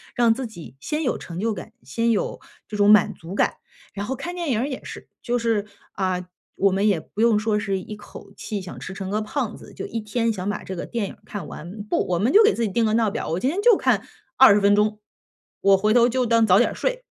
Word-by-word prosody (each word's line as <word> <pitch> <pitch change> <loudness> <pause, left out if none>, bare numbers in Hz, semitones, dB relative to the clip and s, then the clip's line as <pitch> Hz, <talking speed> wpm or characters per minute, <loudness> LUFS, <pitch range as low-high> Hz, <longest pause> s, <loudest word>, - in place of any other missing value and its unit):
让 235 -2 +4
自 255 +1 -4
己 170 - -12
先 300 - -3
有 250 - -1
成 170 0 -7
就 225 +2 0
感， 180 - -8
先 230 - -1
有 220 -3 0 0.3
这 215 - -7
种 205 0 +4
满 210 -2 +6
足 170 +4 -9
感。 - - +1 0.4
然 200 - -4
后 265 - -2
看 345 +7 -6
电 345 -3 -3
影 230 -5 +1
儿 255 - 0
也 265 -3 -6
是， - - -9
就 245 0 0
是， 225 -3 0 0.2
啊， 185 -2 -2 0.3
我 195 0 +3
们 195 +3 +1
也 195 -6 +2
不 205 - -6
用 230 -2 +4
说 210 0 +1
是 195 -2 -1
一 210 +3 -8
口 210 - -13
气 210 - -5
想 185 -2 -9
吃 - - -7
成 190 -1 -5
个 210 +1 0
胖 235 0 -3
子， - - -13
就 - - -5
1 230 - -4
天 225 +1 -1
想 190 -1 -4
把 205 - -3
这 190 - -6
个 175 - -5
电 230 -4 -2
影 - - -9
儿 - - -22
看 200 -7 -6
完。 190 +6 -8
不， 210 - -1
我 180 - 0
们 220 +9 +1
就 430 +3 +8
给 430 - +4
自 235 - -1
己 220 - 0
定 230 +4 +1
个 215 - +1
闹 225 -3 +2
表， - - -4
我 165 +3 -1
今 255 - 0
天 380 +5 -2
就 465 -2 +6
看 - - +2 0.3
20 215 -6 +7
分 200 0 +4
钟。 210 0 +1 0.6
我 195 0 +5
回 210 +3 +2
头 240 0 +5
就 255 +1 0
当 230 -1 +4
早 190 -3 +5
点 - - +2
睡， - - -2
215 Hz, 275 characters per minute, -23 LUFS, 195-235 Hz, 0.6 s, 就